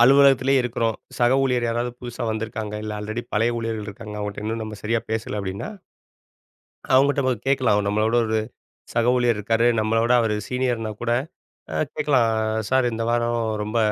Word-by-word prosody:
அலுவலகத்திலேயே 135 0 +6
இருக்றோம். 115 -2 -1 0.2
சக 120 +1 +4
ஊழியர் 125 -3 +1
யாராவது 120 +1 -1
புதுசா 120 0 -6
வந்துருக்காங்க. 110 -1 -4
இல்ல, 110 - -4
ஆல்ரெடி 110 +3 -4
பழைய 115 +3 +2
ஊழியர்கள் 115 -2 -3
இருக்காங்க. 105 +1 -8
அவங்கட்ட 105 0 -4
இன்னும் 110 +1 -2
நம்ம 105 -1 -7
சரியா 115 +1 +1
பேசல 110 -1 -2
அப்படீன்னா 95 - -4 1.3
அவங்கட்ட 130 -2 +3
கேட்கலாம். 135 -5 +3
அவ 105 - +1
நம்மளோட 110 +3 +1
ஒரு 110 0 +1 0.5
சக 120 0 +2
ஊழியர் 120 -3 +2
இருக்காரு, 115 +3 +1
நம்மள 110 +1 +1
விட 120 - +3
அவரு 110 -2 0
சீனியர்ன்னா 125 -4 -1
கூட 120 0 -1 0.6
அ - - -3 0.2
கேட்கலாம், 130 -7 +2 0.3
சார்! 130 -1 +3
இந்த 115 0 -2
வாரம் 120 0 +1 0.2
ரொம்ப 110 +2 -1
115 Hz, 160 wpm, -23 LUFS, 110-125 Hz, 1.3 s, அலுவலகத்திலேயே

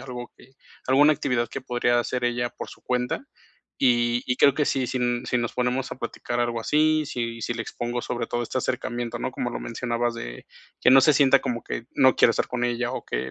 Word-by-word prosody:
algo 125 -2 -7
que 130 - -19 0.3
alguna 145 +4 +5
actividad 120 -4 -1
que - - -6
podría 120 -1 +1
hacer 125 +1 -1
ella 120 0 0
por - - -8
su - - -14
cuenta. 125 - -1 0.5
Y 120 -1 +2
y 125 - 0
creo 140 - +6
que 150 - +1
si 130 -2 0
sin 120 -1 -1
si 125 - +1
nos 120 -1 -3
ponemos 125 +1 -1
a - - -6
platicar 120 +1 -4
algo 120 -1 0
así, 155 +3 +2
si 115 -4 -4
si 120 - -2
le 115 - -3
expongo 120 +1 -4
sobre 120 -1 -3
todo 120 +1 -2
este 125 +2 -3
acercamiento, 120 -2 -3
¿no?, - - -3
como - - -2
lo - - -4
mencionabas, 120 - -2
de - - -7 0.4
que - - +5
no 135 +1 +8
se 150 +3 +5
sienta 140 -1 +5
como 120 -1 -3
que 115 - -5
no 130 -2 +5
quiero - - +6
estar - - -1
con 125 -1 -3
ella 120 0 -1
o - - -5
que 65 +2 -3
120 Hz, 225 wpm, -25 LUFS, 120-130 Hz, 0.5 s, no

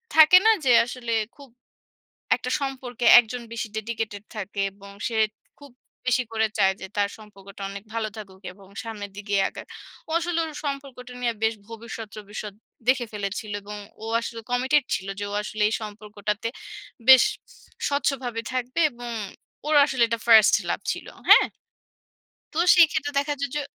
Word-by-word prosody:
থাকে 315 +3 +9
না? - - +7 0.2
যে - - +3 0.2
আসলে 245 -1 -6 0.2
খুব 280 -2 -14 0.9
একটা 255 - -5
সম্পর্কে 255 -3 -4 0.2
একজন 245 +1 -7
বেশি 230 -1 -3
dedicated 220 -2 -4
থাকে 205 -1 -4
এবং 200 0 -14 0.2
সে 230 - -6 0.4
খুব 285 -1 -14 0.4
বেশি 255 0 +3
করে 220 0 +2
চায় 190 - +4
যে - - -6
তার 205 -1 +2
সম্পর্কটা 200 -2 -13
অনেক 200 0 -8
ভালো 225 -1 -1
থাকুক 195 -3 -10
এবং 195 0 -18 0.2
সামনের 210 -3 -6
দিকেই 200 -1 0
আগাক। - - -10 0.4
ও - - -10
আসলে 340 0 -2
ওর 320 - -6
সম্পর্কটা 275 -3 -5
নিয়ে 240 -2 0
বেশ 220 0 +2
ভবিষ্যৎ-টবিষ্যৎ 215 -2 -8 0.3
দেখে 255 -2 +3
ফেলেছিল 205 +1 -4
এবং 210 +1 -8 0.3
ও - - -5
আসলে 230 0 -6
commited 260 +3 +2
ছিল 190 - -4
যে, - - -2
ও - - -3
আসলে 210 0 -4
এই 215 - -2
সম্পর্কটাতে 210 0 -4 0.6
বেশ 260 -1 +10 0.7
স্বচ্ছভাবে 265 -5 -1
থাকবে 255 +4 -2
এবং 240 0 -8 0.6
ওর 305 - +1
আসলে 265 -4 0
এটা 230 0 -1
1st 220 -2 +8 0.2
লাভ - - -1
ছিল। - - -8 0.2
হ্যাঁ? - - +9 1.1
তো 310 - -4 0.2
সেইক্ষেত্রে 310 -4 +4
দেখা 290 +1 0
যায় 280 - -1
যে 295 - 0
230 Hz, 155 wpm, -25 LUFS, 210-265 Hz, 1.1 s, বেশ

